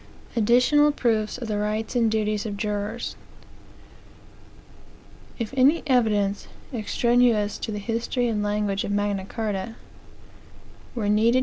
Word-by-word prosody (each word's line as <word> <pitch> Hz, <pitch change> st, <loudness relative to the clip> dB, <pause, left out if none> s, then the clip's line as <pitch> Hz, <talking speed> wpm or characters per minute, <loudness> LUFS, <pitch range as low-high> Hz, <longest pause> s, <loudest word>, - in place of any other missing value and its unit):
ADDITIONAL 250 Hz, +6 st, +4 dB
PROOFS 220 Hz, -5 st, 0 dB
OF 245 Hz, -2 st, -6 dB
THE 210 Hz, -1 st, -1 dB
RIGHTS 215 Hz, +3 st, -2 dB
AND 230 Hz, -2 st, +3 dB
DUTIES 215 Hz, -1 st, -1 dB
OF 205 Hz, -1 st, -5 dB
JURORS 210 Hz, +2 st, -3 dB, 2.2 s
If 230 Hz, +1 st, -4 dB
any 275 Hz, +6 st, +4 dB
evidence, 210 Hz, -7 st, +1 dB, 0.3 s
extraneous 235 Hz, -1 st, +2 dB
to -, -, -4 dB
the 210 Hz, -, -3 dB
history 230 Hz, +3 st, -1 dB
and 215 Hz, -3 st, -1 dB
language 205 Hz, -1 st, -1 dB
of -, -, -4 dB
Magna 205 Hz, -1 st, -1 dB
Carta, 215 Hz, 0 st, -4 dB, 1.2 s
were 220 Hz, -4 st, -1 dB
needed. 225 Hz, +4 st, +4 dB
220 Hz, 120 wpm, -24 LUFS, 205-240 Hz, 2.2 s, ADDITIONAL